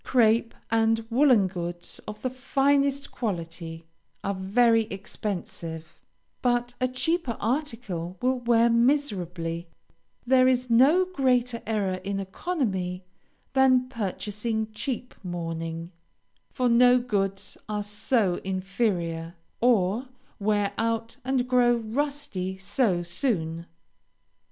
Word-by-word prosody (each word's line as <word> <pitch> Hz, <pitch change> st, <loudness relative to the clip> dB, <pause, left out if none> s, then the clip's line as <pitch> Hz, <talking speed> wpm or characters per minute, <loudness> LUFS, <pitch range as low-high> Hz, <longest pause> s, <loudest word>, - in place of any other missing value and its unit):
Crape 230 Hz, -2 st, +3 dB, 0.2 s
and 225 Hz, 0 st, +2 dB
woolen 250 Hz, -5 st, +5 dB
goods 175 Hz, -2 st, -6 dB
of 210 Hz, 0 st, -8 dB
the 255 Hz, -, -1 dB
finest 275 Hz, +1 st, +1 dB
quality 165 Hz, -6 st, -4 dB, 0.4 s
are 200 Hz, -, 0 dB
very 225 Hz, +4 st, +3 dB
expensive, 175 Hz, -5 st, -6 dB, 0.4 s
but 245 Hz, 0 st, +1 dB
a 255 Hz, -, +3 dB
cheaper 255 Hz, -1 st, -1 dB
article 220 Hz, -, -2 dB
will 255 Hz, 0 st, +1 dB
wear 235 Hz, -1 st, +4 dB
miserably; 185 Hz, -, 0 dB, 0.6 s
there 255 Hz, 0 st, +5 dB
is 255 Hz, -1 st, +1 dB
no 285 Hz, +11 st, +6 dB
greater 250 Hz, -8 st, +1 dB
error 200 Hz, -4 st, 0 dB
in 195 Hz, 0 st, -2 dB
economy 190 Hz, -, -2 dB, 0.5 s
than 260 Hz, -1 st, +4 dB
purchasing 220 Hz, 0 st, -3 dB
cheap 250 Hz, +3 st, -4 dB
mourning, 165 Hz, -1 st, -4 dB, 0.6 s
for 250 Hz, -2 st, 0 dB
no 245 Hz, +1 st, +6 dB
goods 195 Hz, -5 st, -2 dB
are 210 Hz, -1 st, -1 dB
so 205 Hz, -2 st, 0 dB
inferior, 185 Hz, -4 st, -2 dB, 0.3 s
or 230 Hz, 0 st, +2 dB, 0.3 s
wear 205 Hz, -1 st, +1 dB
out 230 Hz, +1 st, -1 dB
and 255 Hz, -1 st, 0 dB
grow 245 Hz, -1 st, +4 dB
rusty 230 Hz, -5 st, -3 dB
so 190 Hz, -2 st, +1 dB
soon. 170 Hz, -3 st, -1 dB
225 Hz, 105 wpm, -26 LUFS, 185-250 Hz, 0.6 s, no